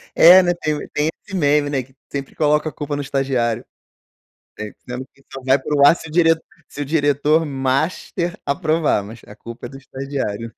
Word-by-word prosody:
É, 180 +3 +9
né, 175 0 +2
tem 150 -1 -2
tem 150 +1 +1 0.2
esse 200 - -7
meme, 145 -3 +2
né, 135 -3 -1
que 130 +2 -22 0.2
sempre 140 -1 -5
coloca 150 0 +2
a - - -11
culpa 145 -1 -4
no 145 - -2
estagiário. 135 -5 -1 0.9
É 110 -1 -5
que 130 +2 -10
só 135 - -7
vai 135 +1 +3
pro 140 +1 +2
ar 155 - +7
se 160 - -10
o - - -11
diret 165 -1 +4 0.3
se - - -9
o - - -2
diretor 145 +1 +2
master 155 +6 -1
aprovar, 155 - +1
mas 110 +3 -10
a - - -12
culpa 115 +1 -9
é - - -7
do 135 - -11
estagiário. 130 -5 -5
145 Hz, 195 wpm, -20 LUFS, 130-155 Hz, 0.9 s, É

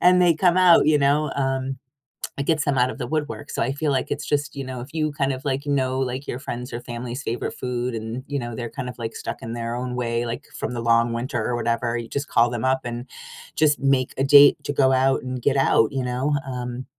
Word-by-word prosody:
and 180 0 +5
they 175 -2 +5
come 180 +1 +3
out, 180 -2 +6
you 150 -1 +5
know, 145 +2 +2
um, 135 -1 -1 0.6
it 140 - -2
get 155 -3 +2
them 140 -2 0
out 125 +1 +3
of - - -6
the 125 -3 -4
woodwork, 150 -1 -3
so - - -2
I 135 - +1
feel 145 0 -1
like 130 -1 0
it's 145 - -2
just, 145 0 -1
you 140 - -4
know, 130 -2 -6
if 135 +5 -11
you 155 -1 0
kind 140 -2 0
of 130 +2 -7
like 140 +1 -1
know, 130 -2 0
like, 130 +1 -3
your 120 - -3
friends 125 -2 -6
or 120 - -4
family's 120 +2 -6
favorite 120 - -3
food 125 -1 -3
and, 115 +3 -5
you 145 - -2
know, 120 -2 -5
they're 120 -2 -4
kind 130 -3 -5
of 125 - -8
like 115 -1 -4
stuck - - -6
in 115 +1 -5
their 115 0 -3
own 125 0 -4
way, 120 -1 -1
like, 115 0 -5
from 125 - -3
the 120 - -3
long 115 0 +3
winter 120 -1 -2
or 120 - 0
whatever, 115 0 -1
you 115 -1 -5
just 140 +3 -3
call 120 +1 +3
them 120 +1 -3
up 130 0 +2
and 120 +1 -5 0.5
just 150 -1 +3
make 135 -2 +1
a 135 - +1
date 140 +1 +8
to 145 - -2
go 135 -1 +3
out 130 +1 +3
and 130 -1 -4
get 140 -1 +2
out, 115 -3 +3
you 135 -1 -2
know? 125 +4 0
Um, 125 0 -5
130 Hz, 260 wpm, -23 LUFS, 120-140 Hz, 0.6 s, date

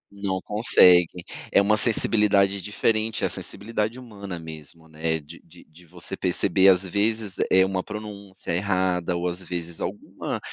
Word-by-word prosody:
Não 100 -2 -2
consegue. 90 -5 +4 0.3
É - - +5
uma 105 +2 +3
sensibilidade 105 -3 +3
diferente, 110 +2 -1
a - - 0
sensibilidade 110 +2 -4
humana 100 -7 -8
mesmo, 80 0 -11
né, 80 +1 -2
de 75 +3 -14
de 85 +1 -18
de 85 +3 -19
você 90 +3 -7
perceber, 95 +1 +3
às 95 0 +5
vezes, 105 +1 -1
eh, 95 0 +5
uma 95 -1 -2
pronúncia 105 -2 -8
errada 90 -2 0
ou, 85 +1 -2
às 90 +1 -3
vezes, 85 -2 -5
alguma, - - -5
95 Hz, 150 wpm, -24 LUFS, 85-105 Hz, 0.3 s, É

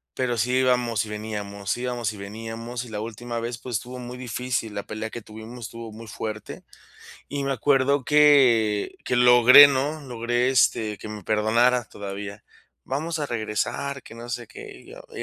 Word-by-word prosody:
pero 120 -2 -1
sí 120 +3 0
íbamos 125 -4 +1
y - - -10
veníamos, 105 -2 -4
íbamos 120 -3 -3
y - - -11
veníamos, 115 +4 -6
y 120 - -11
la 105 -1 -4
última 115 +2 -5
vez, 115 +1 -4
pues, 120 -4 -3
estuvo 125 +2 -8
muy 125 0 -7
difícil, 125 -2 -3
la 100 - -3
pelea 110 +1 -5
que 120 - -7
tuvimos 110 +2 -10
estuvo 115 0 -8
muy 115 +2 -10
fuerte. 110 -1 -6 0.7
Y 145 0 -3
me 135 - 0
acuerdo 135 +1 +2
que 125 -9 +4
que 125 - 0
logré, 125 +3 +9
¿no? 145 +3 -1
Logré, 120 0 -1
este, 110 -5 +2
que 110 - -8
me 105 -3 -8
perdonara 115 +3 +2
todavía. 100 +1 -7 0.4
"Vamos 160 +4 -3
a 150 - -1
regresar, 120 +5 -3
que - - -13
no 120 +1 -9
sé 120 - -4
qué", 420 -1 -11
y 380 - -16
yo - - -11
y - - -4
120 Hz, 180 wpm, -24 LUFS, 110-130 Hz, 0.7 s, logré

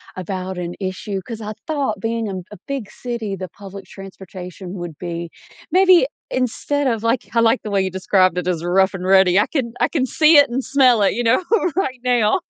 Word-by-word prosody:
about 185 0 -5
an 175 -1 -4
issue, 190 +1 -4
'cause 225 -2 -6
I 215 0 -5
thought 280 -10 -1
being 225 0 -2
a - - -4
m 185 -1 -5
a 210 - -9
big 275 -7 -4
city, 235 -5 -4
the 185 -1 -7
public 195 +1 -11
transportation 185 -1 -10
would 175 -5 -7
be 170 -1 -5 0.4
maybe 370 +3 +5 0.2
instead 265 +3 -1
of 230 -3 -1
like 230 +2 0
I 230 - +4
like 230 +2 +3
the 210 - -5
way 195 - +2
you 190 0 -2
described 185 -1 +2
it 180 0 -2
as 170 -2 -1
rough 190 +3 +2
and 185 -1 -5
ready, 190 0 +5
I 210 - +2
can 245 -6 -2
I - - +3
can 280 -6 0
see 305 +4 +5
it 285 -3 +6
and 255 +2 -2
smell 260 -4 +4
it, 195 - +3
you 240 - -2
know, 235 +9 +3 0.3
right 265 -9 -1
now. 245 - +2
210 Hz, 215 wpm, -20 LUFS, 185-250 Hz, 0.4 s, it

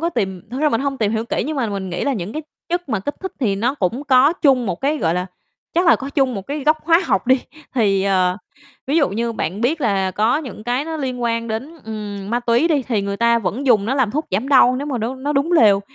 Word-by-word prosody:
có 335 +1 0
tìm 190 - -2
thực 255 +3 -4
ra 305 - +4
mình 230 - 0
hông 275 -1 -2
tìm 215 -1 +1
hiểu 220 0 -1
kỹ - - -1
nhưng 310 -1 -3
mà 255 - 0
mình 195 -3 -4
nghĩ 175 - -3
là 280 - +1
những 200 -3 -4
cái 310 - -4 0.3
chất 350 -2 -2
mà 220 -6 -1
kích 290 +9 -4
thích 380 - -5
thì 200 -5 +1
nó 235 +6 0
cũng 245 +4 -2
có 275 +2 +5
chung 270 -8 +2
một 185 - -1
cái 295 +3 0
gọi 165 -3 +1
là, 180 +1 -2 0.5
chắc 350 +2 +2
là 335 - +6
có 275 +1 -6
chung 270 -4 +1
một 195 - -4
cái 285 0 -4
gốc 310 +1 +4
hóa 330 +1 +5
học 195 +4 0
đi. 260 0 +4 0.3
Thì, 200 -6 +2
ờ, 185 -2 +2 0.5
ví 280 +4 +1
dụ 300 -4 +3
như 230 +3 -2
bạn 185 0 -3
biết 285 +7 0
là 195 -6 +1
có 215 +8 +1
những 255 -8 -8
cái 245 +4 -1
nó 320 0 -4
liên 255 -4 -3
quan 230 -1 -1
đến, 255 +9 -4
ừm, 205 -2 -6
ma 240 +1 0
túy 240 +7 +2
đi 290 -5 +2
thì 225 -5 -1
người 200 0 -3
ta 235 +1 +3
vẫn 230 +6 -3
dùng 215 -6 +4
nó 255 - 0
làm 260 -6 +1
thuốc 305 +7 -2
giảm 215 +9 -1
đau 255 -2 +5
nếu 285 - -4
mà 265 -5 -2
nó 230 +4 -2
nó 280 +3 -3
đúng 280 +5 +1
lều, 210 - +5
245 Hz, 280 wpm, -20 LUFS, 205-280 Hz, 0.5 s, là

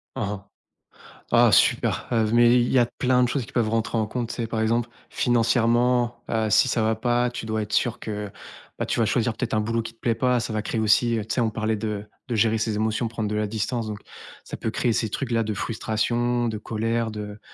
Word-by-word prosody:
Hein, - - -2 0.9
hein. - - -20
Ah - - +5
super, - - +3
heu, 110 -3 +2
mais 120 0 +6
il 120 - +1
y 130 - +4
a 120 - +4
plein 125 +1 +1
de - - +3
choses 125 -1 -2
qui - - -15
peuvent 115 -3 +1
rentrer 115 +1 -1
en 110 -1 0
compte, 120 +1 -3
tu - - -5
sais? 115 -2 -3
Par 110 -1 -3
exemple, 115 +2 +1 0.2
financièrement, 120 +1 +2
heu, 110 -1 0
si 130 - +4
ça 115 -2 0
va 110 0 +1
pas, 120 0 +1
tu 120 -2 -6
dois 110 0 -1
être 105 - -8
sûr 120 -1 +1
que, 105 -2 -5 0.5
ben, - - 0
tu - - -1
vas - - +3
choisir - - +1
peut-être - - -4
un 110 - +2
boulot 115 +2 -1
qui 115 0 -8
te 115 - -35
plaît 115 -2 0
pas, 125 0 +2
ça 115 - -4
va 110 - -1
créer 115 - -3
aussi 115 +2 +3
tu 105 - -5
sais, 125 - +1
on 115 - +2
parlait 110 0 -1
de 105 -1 -4 0.2
de 120 - -1
gérer 110 +1 +3
ses 110 -1 -1
émotions, 110 +2 0
prendre 110 -2 -3
de 105 - -2
la 105 0 0
distance, 110 +2 -2
donc 105 -1 -5 0.4
ça - - -7
peut - - -2
créer 120 - 0
ces 110 -1 0
trucs 125 +2 -4
là, 115 -1 +2
de 110 0 -2
frustration, 120 +3 -1
de 110 - -3
colère, 115 +2 -2
de 105 -1 -7
115 Hz, 245 wpm, -24 LUFS, 110-120 Hz, 0.9 s, mais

